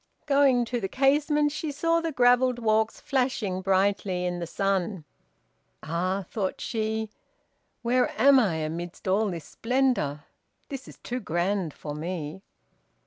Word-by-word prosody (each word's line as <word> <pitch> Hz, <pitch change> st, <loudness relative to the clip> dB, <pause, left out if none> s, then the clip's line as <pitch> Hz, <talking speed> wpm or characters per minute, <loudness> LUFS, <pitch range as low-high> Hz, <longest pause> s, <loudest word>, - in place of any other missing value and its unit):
Going 275 Hz, -4 st, +4 dB
to 240 Hz, 0 st, -3 dB
the 195 Hz, -, -1 dB
casement, 295 Hz, +5 st, +2 dB
she 305 Hz, 0 st, -3 dB
saw 330 Hz, +3 st, +1 dB
the 330 Hz, -1 st, -2 dB
gravelled 250 Hz, -1 st, +4 dB
walks 220 Hz, -1 st, +1 dB
flashing 245 Hz, -8 st, -1 dB
brightly 190 Hz, -1 st, +1 dB
in 175 Hz, 0 st, -2 dB
the 170 Hz, -, -4 dB
sun. 190 Hz, -2 st, -1 dB, 0.8 s
"Ah," 185 Hz, +4 st, -1 dB
thought 195 Hz, -4 st, -3 dB
she, 220 Hz, -1 st, -2 dB, 0.7 s
"where 250 Hz, +2 st, +2 dB
am 275 Hz, 0 st, +7 dB
I 200 Hz, -9 st, +2 dB
amidst 165 Hz, +3 st, -5 dB
all 205 Hz, +3 st, +2 dB
this 170 Hz, -4 st, -6 dB
splendor? 240 Hz, -, 0 dB, 0.5 s
This 275 Hz, -3 st, -6 dB
is -, -, -12 dB
too 250 Hz, +1 st, -4 dB
grand 180 Hz, -2 st, -1 dB
for 145 Hz, +1 st, -7 dB
me!" 160 Hz, +2 st, -5 dB
215 Hz, 140 wpm, -27 LUFS, 180-255 Hz, 0.8 s, am